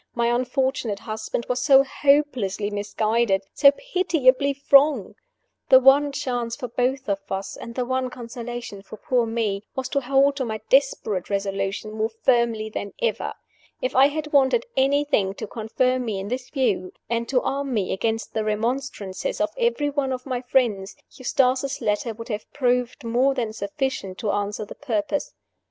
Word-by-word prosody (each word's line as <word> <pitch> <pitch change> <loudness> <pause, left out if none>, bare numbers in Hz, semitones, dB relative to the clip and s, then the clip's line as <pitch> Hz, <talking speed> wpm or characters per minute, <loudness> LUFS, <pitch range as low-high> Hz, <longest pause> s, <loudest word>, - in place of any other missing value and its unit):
my 235 -1 +2
unfortunate 250 -3 0
husband 220 +1 -4
was 250 0 -1
so 270 0 +6
hopelessly 265 -8 +1
misguided, 205 0 0
so 280 - +7 0.2
pitiably 280 -6 +3
wrong! 275 -6 +5 0.6
The 260 - +9
one 275 +2 +5
chance 245 -4 -2
for 250 - -5
both 255 +3 -1
of 200 -1 0
us, 195 +1 -3
and 235 - -9
the 250 - -1
one 260 0 -1
consolation 240 -3 -7
for 205 +2 -11
poor 245 +1 0
Me, 220 -3 -1
was 265 -1 -3
to 280 - 0
hold 275 +2 +3
to 265 - -1
my 220 -3 -3
desperate 260 -9 +2
resolution 195 +1 -2
more 220 +1 -1
firmly 230 -1 +1
than 205 -2 -5
ever. 480 - -1 0.5
If - - -2
I 270 +1 +7
had 300 +1 -5
wanted 280 - +4
anything 270 -8 +2
to - - -5
confirm 250 +4 -1
me 210 -4 -2
in 195 +1 -5
this 250 +1 -4
view, 210 -10 0
and 235 0 -2
to 260 - +3
arm 275 0 -2
me 205 -6 0
against 225 +3 -2
the 220 - -1
remonstrances 220 - -2
of - - 0
every 470 -13 0
one 280 -2 -1
of 255 -1 -4
my 255 -3 -2
friends, 230 -7 0 0.2
Eustace's 260 +1 0
letter 210 +3 -1
would 230 +2 -9
have 210 -1 -5
proved 250 -1 0
more 250 +4 +2
than 230 -4 -2
sufficient 200 -2 -3
to 215 -4 -1
answer 205 +1 -2
the - - -9
purpose. 250 +1 -2
245 Hz, 165 wpm, -24 LUFS, 215-270 Hz, 0.6 s, The